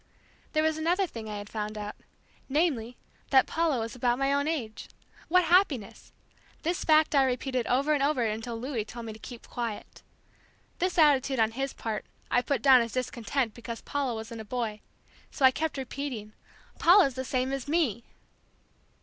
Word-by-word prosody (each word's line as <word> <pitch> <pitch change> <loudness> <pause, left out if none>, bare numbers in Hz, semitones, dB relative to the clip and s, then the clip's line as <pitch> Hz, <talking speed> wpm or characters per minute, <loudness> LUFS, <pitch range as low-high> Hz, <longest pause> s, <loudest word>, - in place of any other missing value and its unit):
There 310 -1 +2
was 315 0 +1
another 350 +5 +2
thing 225 -10 -8
I 210 - -4
had 205 0 -7
found 215 0 -4
out; 210 0 -5 0.5
namely, 265 -6 0 0.3
that 265 -2 +6
Paula 325 -4 0
was 230 +2 -4
about 245 -1 +1
my 275 +1 +1
own 285 +1 +1
age. 245 -9 -3 0.4
What 365 +2 +4
happiness! 335 - +1 0.5
This 340 +2 -1
fact 310 0 +4
I 275 -2 +5
repeated 255 -1 -1
over 280 +5 +2
and 290 - +1
over 280 -3 +2
until 225 +1 -3
Louis 250 -2 -2
told 235 +2 -8
me 220 - -6
to 220 - -13
keep 240 +1 -10
quiet. 230 -4 -5 0.8
This 365 0 0
attitude 280 -4 +4
on 220 -1 +3
his 270 +3 -3
part 220 -2 -4 0.3
I 245 - +4
put 280 +2 -1
down 265 -3 +7
as 230 -1 -3
discontent 250 -1 -1
because 230 -1 -7
Paula 275 -4 -2
wasn't 220 +1 -6
a - - -7
boy, 220 -1 -3 0.5
so 270 - +1
I 260 - +8
kept 315 +2 -2
repeating, 255 -5 -5 0.5
"Paula's 345 -5 +6
the 260 +1 -4
same 255 0 -1
as 275 -1 -4
me!" 285 - +1
255 Hz, 175 wpm, -28 LUFS, 230-290 Hz, 0.8 s, I